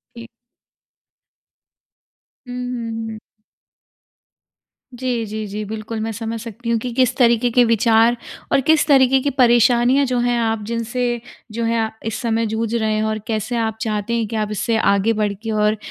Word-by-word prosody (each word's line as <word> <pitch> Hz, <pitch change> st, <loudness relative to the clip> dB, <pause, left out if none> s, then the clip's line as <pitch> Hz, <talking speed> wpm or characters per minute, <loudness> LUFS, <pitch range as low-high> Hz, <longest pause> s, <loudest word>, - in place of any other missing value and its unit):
ठीक। 235 Hz, 0 st, -9 dB, 2.2 s
हुँ, 245 Hz, -, -7 dB, 0.2 s
हुँ, 225 Hz, -1 st, -4 dB
हुँ। 220 Hz, -1 st, -7 dB, 1.8 s
जी, 245 Hz, -2 st, -2 dB
जी, 215 Hz, 0 st, -5 dB
जी। 210 Hz, +1 st, -5 dB
बिल्कुल 220 Hz, +1 st, -5 dB
मैं 220 Hz, +1 st, -2 dB
समझ 225 Hz, +1 st, -5 dB
सकती 235 Hz, +1 st, -6 dB
हूँ 230 Hz, -, +2 dB
कि 245 Hz, +2 st, -4 dB
किस 255 Hz, -2 st, +2 dB
तरीके 235 Hz, -1 st, +3 dB
के 245 Hz, +1 st, +4 dB
विचार 230 Hz, +1 st, +3 dB, 0.4 s
और -, -, +4 dB
किस 315 Hz, -1 st, +4 dB
तरीके 270 Hz, -2 st, +5 dB
की 285 Hz, -, 0 dB
परेशानियाँ 245 Hz, +1 st, +4 dB
जो 250 Hz, -1 st, 0 dB
हैं 240 Hz, 0 st, +1 dB
आप 225 Hz, -1 st, -1 dB
जिनसे 240 Hz, +1 st, -2 dB, 0.3 s
जो 230 Hz, +1 st, -2 dB
है 225 Hz, -1 st, 0 dB, 0.2 s
इस 225 Hz, +2 st, -3 dB
समय 230 Hz, -2 st, 0 dB
जूझ 220 Hz, +1 st, -2 dB
रहे 220 Hz, -2 st, 0 dB
हैं। 215 Hz, -, 0 dB
और 215 Hz, -, -2 dB
कैसे 220 Hz, +2 st, -2 dB
आप 220 Hz, -1 st, -1 dB
चाहते 215 Hz, -1 st, -2 dB
हैं 230 Hz, -2 st, 0 dB
कि 225 Hz, -, -4 dB
आप 215 Hz, -1 st, -1 dB
इससे 225 Hz, +2 st, -1 dB
आगे 200 Hz, +1 st, +2 dB
बढ़ 210 Hz, -2 st, 0 dB
के 225 Hz, -, -4 dB
और 215 Hz, 0 st, +2 dB
230 Hz, 170 wpm, -20 LUFS, 220-240 Hz, 2.2 s, तरीके